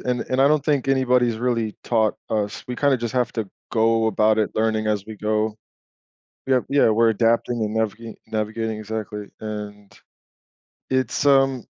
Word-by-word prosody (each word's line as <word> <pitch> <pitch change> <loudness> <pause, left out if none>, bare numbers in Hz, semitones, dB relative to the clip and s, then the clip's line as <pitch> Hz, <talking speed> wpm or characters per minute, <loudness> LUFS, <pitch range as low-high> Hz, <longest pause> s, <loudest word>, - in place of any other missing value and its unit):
and 125 -1 -1
and 130 +1 +1
I 140 - +6
don't 150 -2 +2
think 140 -3 +1
anybody's 125 -3 +2
really 115 -3 -1
taught 110 -3 +2 0.2
us, 105 -1 -2
we 125 -1 -5
kinda 140 -2 +3
just 120 -1 -4
have 125 -2 0
to 110 -4 -3 0.2
go 115 0 +2
about 110 +1 +2
it 105 - +1
learning 110 0 0
as 105 -2 0
we 110 -1 -8
go. 110 0 -1 0.9
Yep, 130 -2 +2
yeah, 140 -4 +4
we're 115 +1 +4
adapting 115 +2 +1
and 105 +1 -3
naviga 110 +1 -2
navigating 110 0 -3
exactly, 105 -1 -5
and 105 -1 -7 1.0
it's, 130 +1 0
um, 135 -3 +3
110 Hz, 165 wpm, -22 LUFS, 110-125 Hz, 1.0 s, I